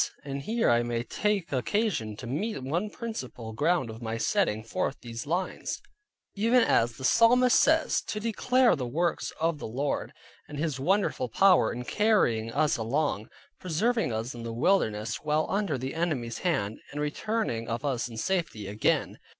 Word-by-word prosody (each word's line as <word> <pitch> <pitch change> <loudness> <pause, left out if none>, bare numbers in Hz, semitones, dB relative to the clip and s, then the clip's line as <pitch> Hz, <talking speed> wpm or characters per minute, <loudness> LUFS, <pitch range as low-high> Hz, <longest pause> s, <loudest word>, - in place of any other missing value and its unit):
And 140 -1 -4
here 225 +10 0
I 120 0 +4
may 120 0 -2
take 205 - -1
occasion 130 - 0
to 120 - -9
mention 140 - -3
one 180 +6 0
principal 130 - -6
ground 150 -1 +1
of 110 +2 -10
my 115 0 -3
setting 115 - +1
forth 115 +4 -2
these 115 +2 -7
lines: 180 +4 -2 0.5
even 230 +4 +3
as 115 - +2
the - - -9
psalmist 240 - +5
says, 320 +1 +3
to 210 - -3
declare 240 +3 +3
the 130 -5 -4
works 170 +7 -1
of 165 -1 0
the - - -5
Lord, 135 +6 -2 0.4
and 150 - -8
His 150 -3 -2
wonderful 175 - +1
power 185 - +4
in 125 +1 -5
carrying 120 - +2
us 150 +4 +2
along, 115 -1 -1 0.3
preserving 215 - 0
us 110 +3 -3
in 120 - -8
the 115 0 -5
wilderness, 115 - +1
while 155 +1 0
under 195 -8 0
the 130 +2 -4
enemy's 145 -9 -2
hand, 135 - -1
and 145 - -5
returning 150 - -2
of 115 +5 -3
us 130 -4 -1
in 115 -2 -9
safety 165 - -1
again. 105 +2 0
145 Hz, 165 wpm, -28 LUFS, 115-195 Hz, 0.5 s, psalmist